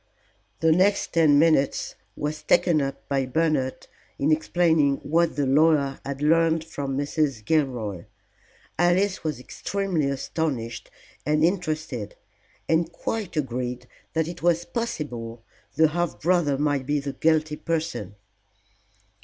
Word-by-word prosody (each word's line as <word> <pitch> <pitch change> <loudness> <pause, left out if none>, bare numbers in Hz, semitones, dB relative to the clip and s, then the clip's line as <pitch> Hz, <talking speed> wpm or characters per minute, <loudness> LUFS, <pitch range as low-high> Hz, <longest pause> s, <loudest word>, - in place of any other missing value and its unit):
The 160 0 +4
next 190 +5 +2
ten 155 -4 +5
minutes 155 -3 +2 0.2
was 150 +1 -3
taken 170 0 +3
up 135 0 -5
by 135 -2 0
Bernard 145 -2 0 0.3
in 145 +3 +1
explaining 160 -2 +3
what 165 +2 +1
the 145 - 0
lawyer 140 0 +3
had 140 +1 -5
learned 165 +1 +3
from 140 -4 -4
Mrs. 140 -5 -1
Gilroy. 120 - -1 0.7
Alice 185 +3 +2
was 155 -5 -2
extremely 180 +1 -2
astonished 135 -4 -3 0.3
and 150 +1 +1
interested, 155 - -2 0.5
and 165 +1 +1
quite 195 -6 -4
agreed 125 -3 -3 0.3
that 160 -1 0
it 170 +1 -7
was 170 0 +2
possible 125 - -4 0.3
the 160 -1 +5
half 175 +1 -2
brother 170 -5 +2
might 145 -2 0
be 145 0 +1
the 140 -1 -5
guilty 155 -1 +1
person. 160 - -3
155 Hz, 125 wpm, -25 LUFS, 140-165 Hz, 0.7 s, ten